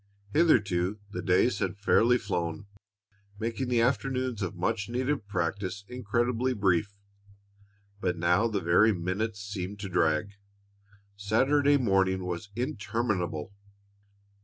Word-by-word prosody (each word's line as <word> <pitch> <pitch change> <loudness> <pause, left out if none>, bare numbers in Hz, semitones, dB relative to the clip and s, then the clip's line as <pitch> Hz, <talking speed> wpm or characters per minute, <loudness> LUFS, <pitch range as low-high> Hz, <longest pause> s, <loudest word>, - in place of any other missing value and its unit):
Hitherto 105 - +3
the - - -4
days 95 +3 +2
had 95 +1 -2
fairly 115 +4 +4
flown, 85 -5 -3 0.7
making 115 +4 -3
the 120 -2 +2
afternoons 130 -2 0
of 95 - -3
much 105 +2 -1
needed 130 -1 -1
practice 95 +1 -3
incredibly 125 +1 -1
brief, 100 0 +1 1.0
but 90 -3 -1
now 90 +7 +3
the 105 -4 -2
very 90 +7 +4
minutes 100 +4 -3
seemed 100 -1 -5
to 100 - -5
drag. 80 +2 +1 0.8
Saturday 135 +8 +3
morning 95 -6 +1
was 90 +3 -4
interminable. 105 - -2
100 Hz, 110 wpm, -28 LUFS, 95-120 Hz, 1.0 s, fairly